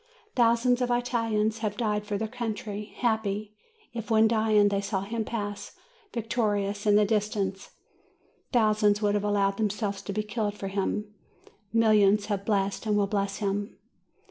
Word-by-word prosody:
Thousands 240 Hz, +1 st, +3 dB
of 250 Hz, -, +1 dB
Italians 230 Hz, -3 st, 0 dB
have 210 Hz, -2 st, -2 dB
died 210 Hz, -2 st, -1 dB
for 205 Hz, -1 st, -1 dB
their 220 Hz, +2 st, -2 dB
country, 215 Hz, -3 st, -4 dB
happy, 215 Hz, -3 st, -1 dB, 0.4 s
if, 230 Hz, -1 st, -6 dB
when 220 Hz, 0 st, +5 dB
dying, 215 Hz, -2 st, +3 dB
they 200 Hz, 0 st, 0 dB
saw 200 Hz, -1 st, -2 dB
him 220 Hz, +3 st, -3 dB
pass 205 Hz, -2 st, -5 dB, 0.4 s
victorious 210 Hz, -3 st, -1 dB
in 205 Hz, -, +5 dB
the 210 Hz, 0 st, +5 dB
dis 210 Hz, 0 st, +1 dB
tance; 195 Hz, -2 st, -3 dB, 0.8 s
thousands 215 Hz, -3 st, +3 dB
would 205 Hz, 0 st, +3 dB
have 205 Hz, -1 st, 0 dB
allowed 200 Hz, -1 st, +1 dB
themselves 205 Hz, -2 st, -1 dB
to -, -, -6 dB
be 215 Hz, +2 st, -1 dB
killed 210 Hz, -1 st, -2 dB
for 195 Hz, -, -4 dB
him; 205 Hz, +2 st, -2 dB, 0.6 s
millions 215 Hz, -2 st, +4 dB
have 200 Hz, -2 st, -3 dB
blessed 200 Hz, 0 st, 0 dB
and 210 Hz, -1 st, +2 dB
will 205 Hz, -, +3 dB
bless 200 Hz, -1 st, -1 dB
him. 205 Hz, 0 st, -2 dB
210 Hz, 160 wpm, -27 LUFS, 205-225 Hz, 0.8 s, when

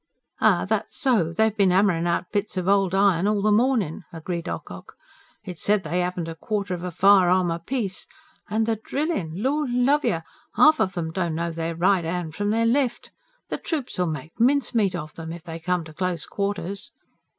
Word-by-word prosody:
"Ay, -, -, +3 dB
that's -, -, -2 dB
so, 230 Hz, -, +2 dB
they've 220 Hz, +4 st, +1 dB
bin 200 Hz, -4 st, +3 dB
'ammerin' 180 Hz, -3 st, +3 dB
out 175 Hz, +1 st, -1 dB
bits 205 Hz, -1 st, -2 dB
of 180 Hz, 0 st, -2 dB
old 195 Hz, -2 st, +3 dB
iron 195 Hz, -2 st, +3 dB
all 210 Hz, -1 st, +2 dB
the 215 Hz, -, +3 dB
mornin'," 220 Hz, -, +1 dB
agreed 170 Hz, +1 st, -5 dB
Ocock. -, -, -8 dB, 0.5 s
"It's 180 Hz, -6 st, -8 dB
said 205 Hz, -1 st, +2 dB
they 175 Hz, +3 st, -1 dB
'aven't 180 Hz, -1 st, -2 dB
a 165 Hz, -, -4 dB
quarter 200 Hz, +2 st, -3 dB
of 175 Hz, -1 st, -5 dB
a 180 Hz, -, -2 dB
firearm 185 Hz, -1 st, +4 dB
apiece. 190 Hz, +4 st, -3 dB, 0.4 s
And 220 Hz, +1 st, +1 dB
the 225 Hz, -1 st, 0 dB
drillin'! 215 Hz, -, -3 dB
Lord 290 Hz, +1 st, 0 dB
love 255 Hz, +5 st, +2 dB
yer! -, -, 0 dB, 0.3 s
'Alf 310 Hz, -1 st, +6 dB
of 190 Hz, -3 st, 0 dB
'em 160 Hz, -2 st, -2 dB
don't 170 Hz, -2 st, -2 dB
know 170 Hz, +1 st, -2 dB
their 165 Hz, 0 st, -3 dB
right 180 Hz, +1 st, +2 dB
'and 165 Hz, -1 st, -3 dB
from 205 Hz, +4 st, -2 dB
their 225 Hz, +2 st, +2 dB
left. 245 Hz, +1 st, 0 dB, 0.4 s
The -, -, -2 dB
troops 285 Hz, -, -4 dB
'ull 180 Hz, -, +2 dB
make 155 Hz, -, -6 dB
mincemeat 235 Hz, -6 st, +2 dB
of 155 Hz, -1 st, -7 dB
'em, 165 Hz, 0 st, -6 dB
if 170 Hz, -1 st, -8 dB
they 165 Hz, -2 st, -7 dB
come 180 Hz, +1 st, -1 dB
to 155 Hz, -1 st, -12 dB
close 180 Hz, -1 st, -2 dB
quarters." 200 Hz, -1 st, -3 dB
190 Hz, 195 wpm, -24 LUFS, 170-215 Hz, 0.5 s, Alf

